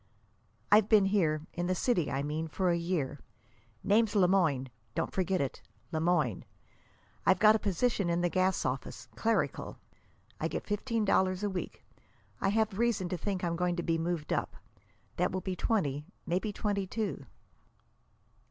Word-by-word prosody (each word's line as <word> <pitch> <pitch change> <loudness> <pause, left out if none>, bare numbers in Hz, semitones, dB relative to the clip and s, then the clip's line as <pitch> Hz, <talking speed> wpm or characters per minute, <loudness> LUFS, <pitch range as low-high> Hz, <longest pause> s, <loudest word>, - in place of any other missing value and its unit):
"I've 210 0 +6
been 210 -3 +6
here 160 -6 +1
in 175 +1 -2
the 185 - +1
city, 180 - +1
I 135 +1 -1
mean 155 +2 -2
for 180 +3 0
a - - +2
year. 170 -5 -2 0.6
Name's 215 +1 +3
Le 190 -3 +5
Moyne. 155 -9 +2 0.2
Don't - - -2
forget 185 0 0
it 135 -2 -3 0.3
Le 160 - -1
Moyne. 175 +2 +1 0.8
I've - - +4
got 215 0 +6
a - - +1
position 205 -1 0
in 170 0 +1
the 175 - +3
gas 185 +1 +1
office, 130 0 -4
clerical. 230 0 -1 0.6
I - - 0
get - - -4
fifteen 220 +1 -1
dollars 185 0 +2
a 205 - 0
week. 185 - -6 0.5
I 195 - +1
have 215 -1 +1
reason 230 -6 +1
to 180 - -2
think 190 +2 -3
I'm 170 -1 0
going 180 0 0
to 175 - -3
be 165 -1 0
moved 165 -2 -2
up. - - -2 0.6
That 180 +1 +1
will 190 - -1
be 185 0 -3
twenty, 150 -8 0 0.2
maybe 185 +5 -1
twenty 200 -2 -2
two." 205 -6 -3
185 Hz, 170 wpm, -31 LUFS, 170-205 Hz, 0.8 s, I've